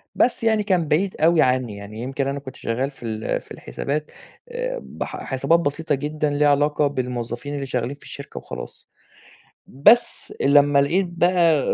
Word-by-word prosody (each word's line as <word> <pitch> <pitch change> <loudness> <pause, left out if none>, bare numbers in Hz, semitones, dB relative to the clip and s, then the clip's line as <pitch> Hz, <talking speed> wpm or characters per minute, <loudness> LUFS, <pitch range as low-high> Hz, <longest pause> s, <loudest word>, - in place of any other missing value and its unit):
بس 245 - +2
يعني 220 -2 +3
كان 185 -5 +1
بعيد 180 +6 +1
أوي 165 +1 +5
عنّي، 125 -4 +1
يعني 100 +2 -9
يمكن 135 +2 -2
أنا 140 +1 -2
كنت 130 -2 -10
شغّال 130 +5 -2
في 135 - -15
ال 110 -1 -2
في - - -22
الحسابات 145 - -4 0.4
آآ، - - -3
بح - - -6
حسابات 135 +5 +2
بسيطة 155 -1 -1
جدًا 150 +2 -2
ليها 145 0 +3
علاقة 145 +1 +2
بالموظّفين 125 0 -4
اللي 140 -1 -3
شغّالين 125 +1 -2
في - - -20
الشركة 140 - -9
وخلاص. - - -8 0.8
بس 210 - +3
لمّا 145 0 +5
لقيت 175 +8 +2
بقى 170 -2 +3
145 Hz, 165 wpm, -22 LUFS, 130-165 Hz, 0.8 s, أوي